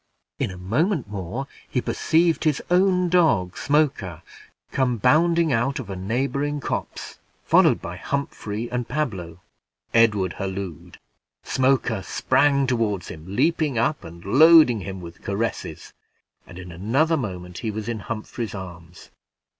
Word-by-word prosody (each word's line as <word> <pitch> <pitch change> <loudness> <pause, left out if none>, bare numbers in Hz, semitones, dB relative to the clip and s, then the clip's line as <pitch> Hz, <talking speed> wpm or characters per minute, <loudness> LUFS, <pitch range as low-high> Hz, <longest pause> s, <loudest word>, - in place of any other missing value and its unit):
In - - 0
a 90 - -8
moment 130 - 0
more, 100 +6 -5 0.2
he 125 - 0
perceived 165 +6 +1
his 150 -3 +2
own 180 0 +3
dog, 155 - +2
Smoker, 140 - 0 0.5
come 125 -3 +1
bounding 165 +6 +3
out 130 +6 0
of 120 -8 -6
a - - -4
neighboring 135 +9 -1
copse, - - -5 0.2
followed - - +4
by - - -6
Humphrey 120 -5 -4
and 125 -1 -2
Pablo. 95 - -3 0.5
Edward 105 -6 +3
hallooed. 95 -4 -5 0.5
Smoker 130 -5 +1
sprung 140 +7 +2
toward 115 -7 0
him, 80 0 -9
leaping 150 0 +1
up, 130 +6 0
and 85 +1 -11
loading 150 +1 +7
him 95 0 -6
with 85 -1 -11
caresses, 110 +3 -4 0.5
and 90 - -12
in 90 -1 -9
another 125 - +1
moment 90 - -5
he 115 - -3
was 110 +1 -5
in 115 -2 -3
Humphrey's 110 +1 -5
arms. 90 -2 -10
115 Hz, 135 wpm, -23 LUFS, 95-145 Hz, 0.5 s, loading